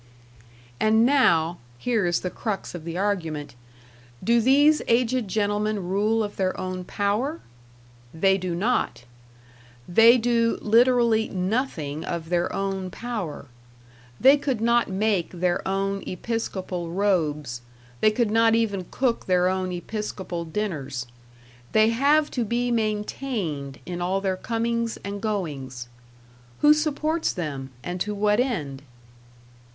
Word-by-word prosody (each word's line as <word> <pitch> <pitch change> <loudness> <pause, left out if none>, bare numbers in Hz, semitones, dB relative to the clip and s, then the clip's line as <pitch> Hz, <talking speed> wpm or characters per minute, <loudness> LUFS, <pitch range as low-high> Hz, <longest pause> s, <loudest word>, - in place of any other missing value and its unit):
And 220 +1 +4
now 175 - +3 0.2
here 220 - 0
is 175 -1 +1
the 180 - -3
crux 215 -4 -4
of 170 -3 -8
the 170 +1 -4
argument 165 -7 -2 0.7
do 235 +1 +3
these 290 +5 +5
aged 245 0 +2
gentlemen 205 -1 -1
rule 215 +4 +1
of 205 -1 -6
their 185 -1 -1
own 185 0 -4
power? 210 - -1 0.7
They 190 +5 +2
do 180 -2 -3
not! 205 - 0 0.8
They 225 +7 +7
do 230 -1 +1
literally 230 0 +3
nothing 180 - -2
of 165 -1 -4
their 175 0 +1
own 195 -1 -2
power; 210 -9 -5 0.7
they 275 +2 +7
could 275 -5 -2
not 235 +1 +3
make 195 -2 0
their 175 0 -1
own 195 +1 -1
episcopal 185 -4 -4
robes, 155 - 0 0.4
they 215 - +5
could 215 0 0
net 225 0 +4
even 200 -5 0
cook 250 -3 -1
their 180 -1 +3
own 185 0 -1
episcopal 180 -2 -5
dinners. 155 - -3 0.7
They 220 0 +5
have 285 +6 +3
to 245 - -1
be 240 +2 -1
maintained 210 - -2
in 175 -1 -5
all 185 +2 0
their 190 -1 -1
comings 230 +3 -2
and 200 0 -5
goings. 140 - -4 0.7
Who 295 0 +7
supports 305 +1 0
them, 140 -7 -5
and 180 0 -4
to 210 0 -1
what 210 +1 +2
end? 155 - -2
205 Hz, 130 wpm, -25 LUFS, 175-230 Hz, 0.8 s, They